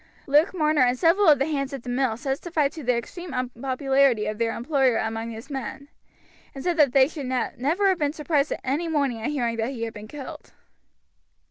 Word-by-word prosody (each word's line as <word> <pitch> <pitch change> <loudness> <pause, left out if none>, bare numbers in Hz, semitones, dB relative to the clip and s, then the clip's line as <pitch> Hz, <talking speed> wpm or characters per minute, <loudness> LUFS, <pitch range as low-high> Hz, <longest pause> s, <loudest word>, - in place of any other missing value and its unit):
Luke 295 +5 +4
Marner 305 -4 +2
and 250 0 +3
several 350 +7 +3
of 300 -2 +7
the 270 - +1
hands 280 -3 -2
at 270 -3 -6
the 245 - -7
mill 245 -2 0
testified 280 +3 -1
to 315 - -8
the 250 -1 +2
extreme 340 +6 -7
unpopularity 255 -1 +1
of 215 +1 -4
their 230 -1 0
employer 265 -1 +1
among 225 +1 -3
his 230 +5 -9
men, 275 +1 -6 0.7
and 270 - -7
said 350 -1 +1
that 290 -5 +5
they 265 0 +5
should 290 -4 -6
never 275 +8 0
have 370 -2 +1
been 295 -2 +1
surprised 300 -1 0
any 290 +6 -1
morning 280 -8 0
at 225 - -2
hearing 240 -6 -1
that 225 +2 -1
he 245 -4 -5
had 225 -1 -4
been 210 0 -9
killed. 275 +2 -9
270 Hz, 205 wpm, -25 LUFS, 245-300 Hz, 0.7 s, of